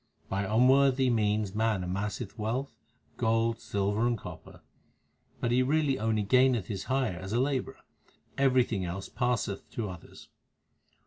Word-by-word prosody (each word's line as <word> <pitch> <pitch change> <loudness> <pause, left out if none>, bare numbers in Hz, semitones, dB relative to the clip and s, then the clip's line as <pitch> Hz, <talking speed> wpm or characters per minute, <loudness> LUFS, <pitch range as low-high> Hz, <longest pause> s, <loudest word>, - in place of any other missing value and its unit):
By 100 +1 -1
unworthy 130 +4 +4
means 105 -3 +1
man 110 -3 0
amasseth 100 +4 -4
wealth, 120 +6 -3 0.4
gold, 115 0 +1
silver, 100 +3 0
and 120 -1 0
copper; - - -11 0.8
But 120 - -1
he 125 +1 +4
really 140 0 +1
only 110 -1 +1
gaineth 125 -1 +3
his 95 +1 -5
hire 130 -9 0
as 95 +3 -6
a 120 - +2
labourer; 130 -1 -1 0.5
everything 125 -7 +2
else 90 +2 -5
passeth 120 -4 -2
to 105 -5 -3
others. 90 - -13
115 Hz, 135 wpm, -29 LUFS, 100-130 Hz, 0.8 s, unworthy